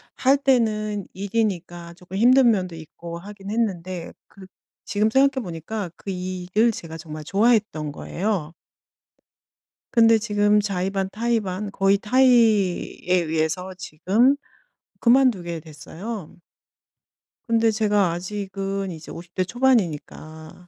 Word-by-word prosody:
할 270 +2 +3
때는 215 -7 +1
일이니까 185 -4 -3
쪼끔 180 +1 -11
힘든 245 +3 +6
면도 185 -5 -2
있고 170 +1 -9
하긴 200 +2 -10
했는데 185 -6 -2
그 195 -1 -14 0.4
지금 210 +1 +1
생각해 265 +2 +3
보니까 180 +3 -5
그 195 - -7
일을 185 +4 0
제가 165 -6 -8
정말 155 -1 -8
좋아했던 200 -5 +1
거예요. 175 0 -3 1.4
근데 230 -1 +6
지금 210 -1 +2
자의 195 -2 -1
반 195 -1 -2
타의 230 +2 0
반 195 +1 -4
거의 195 0 +3
타의에 220 -6 +2
의해서 160 +4 -2
지금 200 - +2 0.6
그만두게 235 -10 +3
됐어요. 165 +5 -8 1.1
근데 230 -1 +3
제가 210 -4 +2
아직은 195 +1 -4
이제 160 -2 -9
50 170 +1 -10
대 185 - +1
초반이니까 175 - -1
195 Hz, 245 characters per minute, -23 LUFS, 175-220 Hz, 1.4 s, 힘든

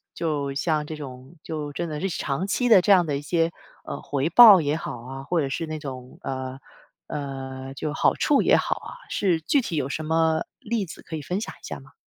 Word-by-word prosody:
就 145 -4 -1
像 150 +1 0
这 155 - -6
种 135 +1 -10
就 150 -2 -4
真 170 +3 -3
的 150 -1 -4
是 195 - -1
长 165 +2 -2
期 245 +4 +1
的 190 -5 +8
这 200 - +2
样 180 -3 +6
的 145 -2 -1
一 - - -5
些， 165 +2 +1 0.3
呃， - - -5
回 145 +2 -1
报 205 -2 +9
也 150 +2 0
好 125 - -5
啊， 135 +2 -8
或 170 +2 0
者 135 - -1
是 165 +4 -2
那 155 0 -4
种， 130 -3 -8
呃， 130 0 -4 0.5
呃， 135 -1 -6
就 150 +2 -3
好 - - +3
处 290 -3 +3
也 - - +5
好 - - +1
啊， - - -9 0.2
是 175 -5 +1
具 280 - +2
体 170 - -4
有 140 -2 -1
什 155 - -3
么 160 0 +2
例 220 -3 -2
子 165 - -10
可 160 - -7
以 - - -6
分 180 +8 -3
享 - - -5
一 - - -11
下 - - -6
吗？ 135 - -18
155 Hz, 250 characters per minute, -25 LUFS, 135-170 Hz, 0.5 s, 报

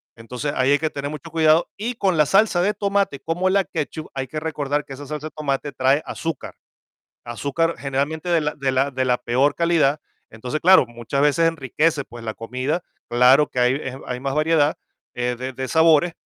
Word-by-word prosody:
Entonces, 125 +5 -5
ahí 130 +2 +2
hay 145 - +4
que 155 - -1
tener 145 0 -5
mucho 155 +2 -8
cuidado. 160 0 +3
Y 230 +4 -3
con 190 -6 +1
la 150 - +5
salsa 195 +1 +3
de 205 +3 +2
tomate, 200 -8 0
como 170 +6 -1
la 195 -1 +2
ketchup, 155 +1 -5
hay 135 -1 -3
que 155 +4 -4
recordar 150 -2 -2
que 135 - -9
esa 145 +2 -9
salsa 150 +1 -5
de - - -11
tomate 145 -1 -3
trae 135 +3 +2
azúcar. 165 -1 -5 0.7
Azúcar 145 +8 -1
generalmente 145 +5 -2
de 170 -2 +3
la 150 0 -2
de 135 -2 -1
la 135 +2 +1
de 130 0 -1
la 125 -1 +2
peor 130 +4 +1
calidad. 155 -4 +2 0.3
Entonces, 125 +7 -5
claro, 185 -4 +6
muchas 120 +4 -3
veces 155 +3 +3
enriquece, 150 0 0
pues 120 -1 -11
la 110 -1 -4
comida. 130 - -3 0.3
Claro 125 +5 +5
que 125 - -6
hay 125 +1 +3
eh, 130 -2 -6
hay 125 0 -4
más 135 0 -2
variedad, 155 -1 +2 0.4
eh, 125 0 -2
de 130 +1 -5
de 130 0 -5
sabores, 160 +1 +4
145 Hz, 205 wpm, -22 LUFS, 130-160 Hz, 0.7 s, claro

